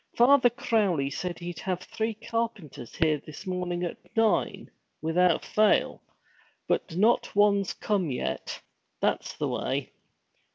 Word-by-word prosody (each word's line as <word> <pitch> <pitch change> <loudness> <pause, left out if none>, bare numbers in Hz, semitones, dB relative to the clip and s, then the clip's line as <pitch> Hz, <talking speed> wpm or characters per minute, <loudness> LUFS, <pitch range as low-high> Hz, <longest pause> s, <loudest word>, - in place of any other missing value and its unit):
Father 250 +1 +6
Crowley 210 - 0
said 175 +3 -4
he'd 175 -1 -6
have 185 -1 -2
three 220 0 -3
carpenters 220 - -4
here 155 -3 +2
this 155 +5 -10
morning 180 -1 -2
at 175 +5 -3 0.2
nine, 225 -1 +1 0.3
without 165 +2 +2
fail; 215 0 +2 0.7
but 165 - -1
not 220 +3 +2
one's 200 -2 +3
come 195 -6 -1
yet. 65 - -3 0.4
That's - - -1
the - - -1
way!' - - -2
185 Hz, 125 wpm, -27 LUFS, 170-220 Hz, 0.7 s, Father